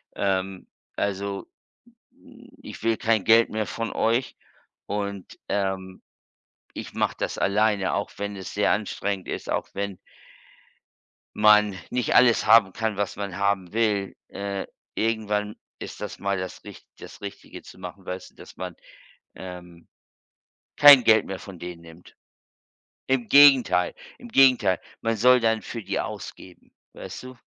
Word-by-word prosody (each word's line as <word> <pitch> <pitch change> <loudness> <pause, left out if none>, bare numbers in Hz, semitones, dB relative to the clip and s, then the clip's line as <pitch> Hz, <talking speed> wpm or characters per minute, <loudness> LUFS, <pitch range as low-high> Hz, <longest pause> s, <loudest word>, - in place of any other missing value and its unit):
ähm, 95 -1 -2 0.3
also, 100 0 -3 0.6
hm, 250 -1 -18
ich - - -10
will 115 -1 +1
kein 110 -3 +1
Geld 115 +2 +5
mehr 110 0 -2
von 115 0 -4
euch. 120 +3 0 0.5
Und, 100 -2 -5
ähm, 95 -2 -3 0.7
ich - - -8
mache - - -1
das - - -3
alleine, 105 -1 +1
auch 100 - -2
wenn 100 0 -5
es 95 -1 -8
sehr 105 - +2
anstrengend 100 -2 -3
ist, - - -5
auch - - -2
wenn 100 -1 -4 1.4
man 105 -1 +5
nicht 125 -3 -1
alles 120 -2 +5
haben 110 -5 +6
kann, 110 -2 -2
was 100 -2 -2
man 100 -2 -5
haben 100 -2 -1
will. 105 -4 0
Äh, 100 -1 -5 0.3
irgendwann 105 -2 -1 0.2
ist - - -8
das - - -7
mal 100 0 -1
das 95 0 -6
Richt - - -12
das - - -12
Richtige 100 0 -9
zu - - -14
machen. 95 +1 -9
Weißt 90 +1 -7
du, - - -34
dass - - -14
man, 90 -2 -6 0.6
ähm, 90 -2 -11 0.9
kein 145 -3 +9
Geld 110 -1 +5
mehr 95 -1 -6
von 95 -3 -11
denen 85 -1 -8
nimmt. 85 +1 -16 0.9
Im 130 -3 0
Gegenteil, 135 -10 +6 0.2
im 240 - -12
Gegenteil. 125 - +4 0.2
Man 115 -1 -1
soll 125 +2 +5
dann 110 -1 +1
für 115 -2 -7
die - - -2
ausgeben, 90 -1 -8 0.2
weißt - - -9
du. 130 0 -11
100 Hz, 145 wpm, -25 LUFS, 95-115 Hz, 1.4 s, kein